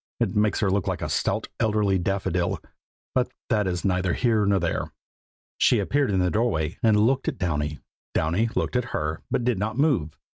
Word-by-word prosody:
It 115 -3 0
makes 105 -1 +2
her 100 -3 +2
look 100 -2 +1
so - - +2
like - - -3
a - - -2
stout - - 0
elderly 105 -3 +2
daffodil, 90 -1 -1 0.5
but 125 -1 +1 0.2
that 105 -4 +2
is 90 0 -2
neither 90 -2 +1
here 110 -5 +2
nor 100 -1 +3
there. - - -2 0.7
She - - +4
appeared 145 -1 +1
in 95 - +1
the 90 - +1
doorway 100 -7 0
and 110 -2 +4
looked 125 +5 +2
at - - -1
Downy. 75 -5 -1 0.4
Downy 90 +9 +1
looked - - -1
at 125 -1 +1
her, 75 +1 -3
but 125 - 0
did 120 -5 +1
not 110 +3 -2
move. 130 - +1
100 Hz, 195 wpm, -25 LUFS, 90-115 Hz, 0.7 s, She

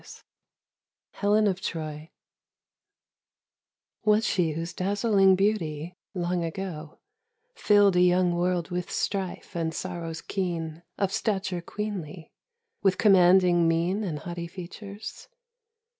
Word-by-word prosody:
IV - - -14 0.9
HELEN 210 +1 +2
OF 190 -2 0
TROY 155 -3 -5 1.9
WAS 215 +1 +3
she 175 -6 +1
whose 165 +2 -4
dazzling 195 +1 +3
beauty 180 -5 -1 0.2
long 175 -1 -1
ago 165 -3 -5 0.6
Filled 205 - +4
a 180 - +5
young 180 0 +4
world 175 0 0
with 180 0 -3
strife 190 -4 -3
and 160 -1 -2
sorrows 165 -3 -5
keen 170 -4 -3 0.2
Of 195 -1 0
stature 190 -4 -1
queenly, 185 -5 -6 0.5
with 190 -2 +2
commanding 180 -4 +5
mien 170 +6 +1
And 170 -7 -3
haughty 170 +2 -6
features? 200 +4 -9
180 Hz, 110 wpm, -27 LUFS, 170-195 Hz, 1.9 s, a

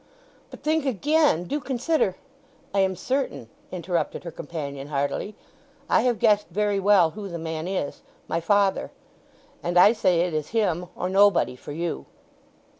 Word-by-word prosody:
"But - - -12
think 310 0 +1
again! 285 - +2
Do 285 +12 -2
consider——" 260 - 0 0.6
"I 200 - +2
am 190 -1 +2
certain," 255 - -2 0.2
interrupted 175 -3 -2
her 170 - -6
companion 140 -3 -6
hardily. 145 +8 -2 0.5
"I - - +4
have 245 -2 +1
guessed 210 0 +3
very 205 +2 0
well 195 -4 +4
who 205 +1 -7
the 170 - -5
man 160 0 -4
is. 185 -6 -3 0.3
My 165 +1 -1
father; 200 +2 +2 0.7
and 175 +1 -1
I 205 +5 +8
say 185 -6 +2
it 175 -1 -1
is 155 -1 -2
him 180 -5 0
or 180 - -2
nobody 195 -7 +4
for 125 - -10
you." 165 +3 -4
185 Hz, 155 wpm, -25 LUFS, 165-210 Hz, 0.7 s, I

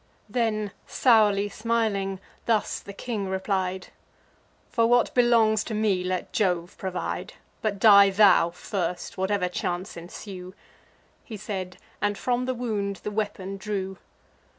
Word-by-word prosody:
Then, 215 -2 -1 0.2
sourly 210 -5 +4
smiling, 210 -3 -1 0.3
thus 220 -3 +1
the 200 - -10
king 205 -1 -4
replied: 190 -1 -2 0.8
"For 230 -1 +3
what 240 0 +3
belongs 230 -3 +4
to 220 - -4
me, 205 -4 +1
let 185 0 -3
Jove 180 -4 0
provide; 185 -2 -4 0.3
But 210 -2 -1
die 200 -1 +8
thou 195 -3 +5
first, 175 0 -4
whatever 190 -1 +1
chance 180 +1 -3
ensue." 180 +2 -9 0.7
He 220 - -8
said, 185 -3 -5 0.2
and 205 -1 0
from 250 0 0
the 255 0 -1
wound 210 -5 -2
the 210 - -3
weapon 200 -2 -3
drew. 195 -2 -4
200 Hz, 130 wpm, -26 LUFS, 190-220 Hz, 0.8 s, die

